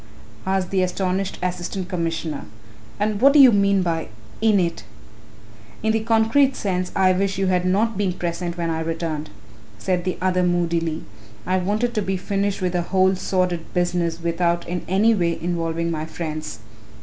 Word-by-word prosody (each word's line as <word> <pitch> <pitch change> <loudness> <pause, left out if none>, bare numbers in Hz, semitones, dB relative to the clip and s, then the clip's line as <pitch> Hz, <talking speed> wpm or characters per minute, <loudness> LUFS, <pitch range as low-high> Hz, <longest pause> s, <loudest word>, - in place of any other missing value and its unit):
asked 190 -1 0
the 190 -1 +2
astonished 185 +1 -1
Assistant 180 +1 -3
Commissioner, 165 -4 -3 0.5
"and 210 0 0
what 275 +2 +7
do - - +5
you 265 -3 +9
mean 200 -2 +3
by 165 -2 -1 0.3
'in 215 -3 +4
it'?" 170 -2 -1 1.0
"In 220 - +3
the 220 - +1
concrete 225 +5 +3
sense 185 -2 -2
I 185 -1 +4
wish 195 +1 0
you 195 - +1
had 180 -1 +1
not 205 +3 +1
been 195 -3 +1
present 175 0 -3
when 170 -1 -1
I 160 - -1
returned," 160 -2 -3 0.5
said 175 - -1
the 185 0 -2
other 185 0 +1
moodily, 170 -2 0 0.4
"I 185 - +1
wanted 210 +6 0
to 215 - 0
be 190 -1 -1
finished 200 +1 -1
with 180 - +1
the 175 - +1
whole 190 +2 +2
sordid 180 -2 -1
business 175 -2 0
without 170 0 0
in 175 0 -3
any 205 +5 +4
way 170 -5 0
involving 170 -1 -1
my 155 -1 -3
friends." 155 -2 -5
180 Hz, 170 wpm, -22 LUFS, 170-195 Hz, 1.0 s, you